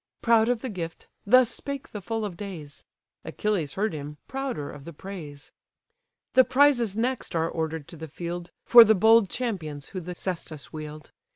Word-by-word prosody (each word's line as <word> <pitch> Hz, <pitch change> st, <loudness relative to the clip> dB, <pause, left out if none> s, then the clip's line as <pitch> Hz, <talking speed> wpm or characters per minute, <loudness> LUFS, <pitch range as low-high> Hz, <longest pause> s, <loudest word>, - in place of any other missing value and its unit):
Proud 230 Hz, -1 st, +4 dB
of 245 Hz, -2 st, 0 dB
the 260 Hz, -, -4 dB
gift, 170 Hz, -5 st, -6 dB, 0.2 s
thus 255 Hz, +2 st, +6 dB
spake 280 Hz, -1 st, -5 dB
the 210 Hz, -, -6 dB
full 225 Hz, +2 st, -3 dB
of 195 Hz, -4 st, -5 dB
days: 170 Hz, -8 st, -9 dB, 0.4 s
Achilles 190 Hz, -9 st, -2 dB
heard 210 Hz, 0 st, 0 dB
him, 150 Hz, 0 st, -7 dB
prouder 265 Hz, -, -4 dB
of 145 Hz, -, -11 dB
the 170 Hz, -, -9 dB
praise. 155 Hz, -5 st, -9 dB, 0.8 s
The 260 Hz, -, +7 dB
prizes 255 Hz, -5 st, +3 dB
next 250 Hz, -4 st, -1 dB
are 165 Hz, 0 st, +1 dB
order'd 160 Hz, -2 st, -3 dB
to 170 Hz, -, -9 dB
the 160 Hz, +1 st, -7 dB
field, 175 Hz, +3 st, -6 dB
For 240 Hz, -1 st, +10 dB
the 220 Hz, 0 st, +4 dB
bold 220 Hz, +1 st, +5 dB
champions 165 Hz, -, -4 dB
who 185 Hz, -, -5 dB
the 180 Hz, +1 st, -7 dB
caestus 165 Hz, -5 st, -6 dB
wield. 155 Hz, -1 st, -8 dB
190 Hz, 175 wpm, -26 LUFS, 160-230 Hz, 0.8 s, For